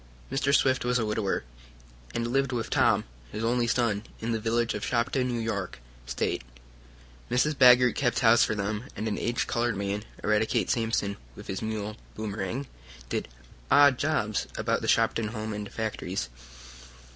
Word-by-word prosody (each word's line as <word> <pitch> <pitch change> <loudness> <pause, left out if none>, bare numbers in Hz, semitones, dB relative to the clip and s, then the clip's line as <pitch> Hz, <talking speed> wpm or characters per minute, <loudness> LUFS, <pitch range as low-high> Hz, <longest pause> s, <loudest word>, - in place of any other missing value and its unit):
Mr. 135 +1 +1
Swift 130 -2 +3
was 125 0 +2
a 115 - 0
widower, 105 - -1 0.7
and 115 - 0
lived 135 +3 +1
with 120 -3 -3
Tom, - - +3 0.3
his 110 - -4
only 120 +1 +2
son, 115 -4 +1 0.2
in 115 +1 -2
the 115 - 0
village 115 +1 0
of 105 - -4
Shopton, 125 +2 +1
New 120 -2 -1
York 105 -5 -3 0.3
State. - - -1 0.9
Mrs. 130 +5 +2
Baggert 125 -2 +7
kept 120 -4 +1
house 115 -1 +6
for 110 - 0
them, 105 +3 -2
and 110 - -3
an 105 - -2
aged 120 0 0
colored 120 -3 0
man, 100 +1 -2 0.2
Eradicate 105 +1 +2
Sampson, 115 -3 0 0.2
with - - -10
his 95 - -4
mule, 110 -1 -3 0.2
Boomerang, 110 +4 -3 0.4
did - - -2 0.4
"odd 140 -3 +6
jobs" 110 -9 0
about - - 0
the - - -3
Shopton 115 -1 +2
home 110 0 -4
and 105 -1 -5
factories. 105 - -3
115 Hz, 160 wpm, -28 LUFS, 105-125 Hz, 0.9 s, Baggert